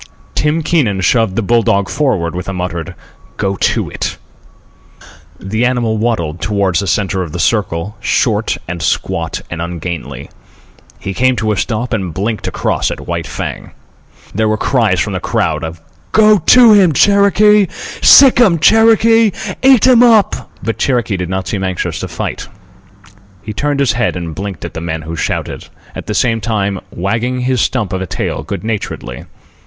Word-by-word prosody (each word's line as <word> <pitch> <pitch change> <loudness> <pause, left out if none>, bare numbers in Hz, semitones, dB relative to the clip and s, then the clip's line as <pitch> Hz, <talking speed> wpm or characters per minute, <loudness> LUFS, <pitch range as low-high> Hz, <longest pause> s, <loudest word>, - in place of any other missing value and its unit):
Tim 150 +2 0
Keenan 120 - +1
shoved 110 +1 +1
the 115 - -1
bull 120 +3 +2
dog 100 -2 +1
forward 90 - -1
with 90 +2 -5
a - - -4
muttered 90 -3 -5 0.4
"Go 100 0 -1
to - - 0
it." - - -4 1.2
The 110 +5 -2
animal 120 -3 0
waddled 85 -8 -2
toward 100 +1 0
the 100 - -1
centre 95 0 0
of 85 -4 -6
the 90 - -4
circle, 100 -1 -1
short - - 0
and 85 0 -5
squat - - -2
and 85 -1 -4
ungainly. 85 -5 -6 0.7
He 95 - -5
came 130 +6 +2
to 110 -2 -1
a - - 0
stop 115 +4 -2
and 95 -7 -3
blinked 105 +4 -3
across - - -1
at - - -7
White - - -4
Fang. - - -6 0.6
There 110 +2 0
were 110 - 0
cries 110 -7 +1
from - - -1
the - - -2
crowd - - -1
of, 80 0 -6 0.3
"Go 215 -1 +5
to 240 -3 +7
him, 190 -6 +5
Cherokee! 200 +3 +4 0.3
Sick 265 -3 +7
'm, 190 -8 +4
Cherokee! 225 +4 +4 0.3
Eat 260 -3 +5
'm 250 -2 +6
up!" 225 -4 +3
But 115 - -3
Cherokee 120 -5 0
did 90 -2 -4
not 95 0 -3
seem 100 -3 -3
anxious 95 -1 -3
to - - -4
fight. - - -5 1.0
He 105 - -6
turned 145 +5 -1
his 140 -3 +2
head 120 +1 -1
and 85 -2 -5
blinked 95 -2 -6
at - - -7
the 80 - -6
men 80 -1 -4
who 80 +1 -6
shouted, - - -4 0.3
at - - -8
the - - -3
same 115 -2 +1
time 100 -3 -1
wagging 115 +7 -2
his 125 -2 0
stump 110 -8 -1
of 95 - -2
a 95 - -4
tail - - -3
good 100 +5 -6
naturedly. 105 - -5
110 Hz, 175 wpm, -14 LUFS, 90-130 Hz, 1.2 s, to